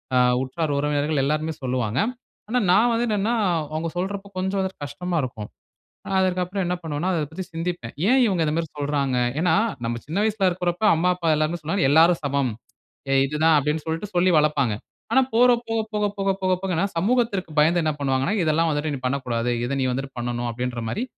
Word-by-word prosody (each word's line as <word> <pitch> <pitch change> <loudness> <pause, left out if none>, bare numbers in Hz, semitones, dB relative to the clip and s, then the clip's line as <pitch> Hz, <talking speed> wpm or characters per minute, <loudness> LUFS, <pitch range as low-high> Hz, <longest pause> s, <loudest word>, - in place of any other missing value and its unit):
ஆ - - +5 0.3
உற்றார், 150 +2 -2
உறவினர்கள் 145 0 0
எல்லோருமே 155 +2 -1
சொல்லுவாங்க. 125 -1 -1 0.5
ஆனா, 250 +1 +2
நான் 220 +6 +5
வந்து 235 +1 +1
என்னனென்னா, 215 +3 +1 0.4
அவுங்க 165 +1 -2
சொல்றப்ப 200 +2 -4
கொஞ்சம் 190 +1 -1
வந்துட்டு 190 -5 -3
கஷ்டமா 180 +4 -3
இருக்கும். 110 -4 -6 0.7
அதற்கு 185 -1 +1
அப்புறம் 190 +2 -3
என்ன 180 +1 0
பண்ணுவேனா, 160 +3 -2
அதை 155 -3 0
பத்தி 185 +3 -5
சிந்திப்பேன். 165 -7 -4 0.2
ஏன் 260 0 +5
இவுங்க 185 -6 +1
இந்த 150 - 0
மாதிரி 165 -2 -2
சொல்றாங்க? 140 -3 0 0.2
ஏன்னா 170 -1 +2 0.3
நம்ம 115 0 -2
சின்ன 160 +6 -4
வயசில 210 -3 +1
இருக்குறப்ப 175 +2 -2
அம்மா, 180 +3 +1
அப்பா 170 -2 -4
எல்லாருமே 155 +3 -1
சொன்னாங்க, 170 +5 -1
எல்லாரும் 165 +3 +5
சமம், 140 -2 0 0.6
ஏ - - +3
இது 150 +2 -5
தான் 160 -1 +6
அப்பிடின்னு 150 +2 0
சொல்லிட்டு 165 +5 -3
சொல்லி 180 +1 +4
வளர்ப்பாங்க. 145 -7 +2 0.4
ஆனா 265 - +6
போற 245 +2 +6 0.2
போக, 225 0 0
போக, 210 0 +1
போக, 195 0 +1
போக 185 0 +2
போகனா 180 -1 0
சமூகத்திற்கு 210 -2 +1
பயந்து 165 +3 +4
என்ன 155 - +1
பண்ணுவாங்கணா, 135 +6 0
இதெல்லாம் 160 +1 +2
வந்துட்டு 150 +1 -1
நீ - - -6
பண்ணக்கூடாது, 125 -3 -1 0.2
இதை 140 +2 -2
நீ - - +1
வந்துட்டு 135 +2 -4
பண்ணணும். 120 0 -2
அப்பிடின்றமாரி 125 - -3
160 Hz, 185 wpm, -23 LUFS, 140-185 Hz, 0.7 s, தான்